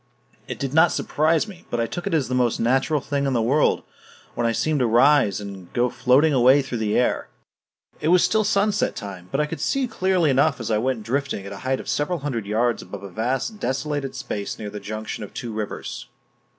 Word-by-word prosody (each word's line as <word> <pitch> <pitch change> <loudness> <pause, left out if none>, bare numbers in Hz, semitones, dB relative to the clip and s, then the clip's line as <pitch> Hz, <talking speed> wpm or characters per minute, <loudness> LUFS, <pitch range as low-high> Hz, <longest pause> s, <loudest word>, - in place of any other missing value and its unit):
It - - -5
did 135 -1 -3
not 160 +2 +5
surprise 160 +6 +1
me, 185 -4 -12
but 120 - -2
I 115 - +2
took 175 +9 -5
it - - -2
as 140 -6 +1
the 125 - -3
most 125 -2 +1
natural 135 +5 +2
thing 140 0 -1
in 135 - 0
the 120 - +2
world 140 +6 +2 0.5
when 120 - 0
I - - +2
seemed 150 +6 0
to 125 - +2
rise 120 -2 +4
and 100 -3 -9
go 120 0 +1
floating 140 +6 +3
away 130 +2 +5
through 125 -3 -4
the 105 -1 0
air. 125 - +1 0.7
It - - -2
was 180 +1 +5
still 220 0 +3
sunset 205 0 +1
time, 95 -4 -8
but 135 - 0
I 150 - +2
could 160 +2 -6
see 275 -2 0
clearly 185 - +1
enough 140 +1 +2
as 115 -1 -3
I 105 - +2
went 125 -1 -1
drifting 125 -3 -2
at 100 - -7
a - - -8
height 130 +5 -1
of - - -9
several 160 +5 0
hundred 130 -8 -4
yards 115 +3 +1
above 100 -1 -9
a 100 - -7
vast 130 - -2
desolated 140 -2 -2
space 100 -1 -4
near 105 -2 -6
the 105 - -6
junction 110 +2 -5
of 105 - -10
two 115 -2 -5
rivers. 105 -1 -5
130 Hz, 225 wpm, -23 LUFS, 110-150 Hz, 0.7 s, not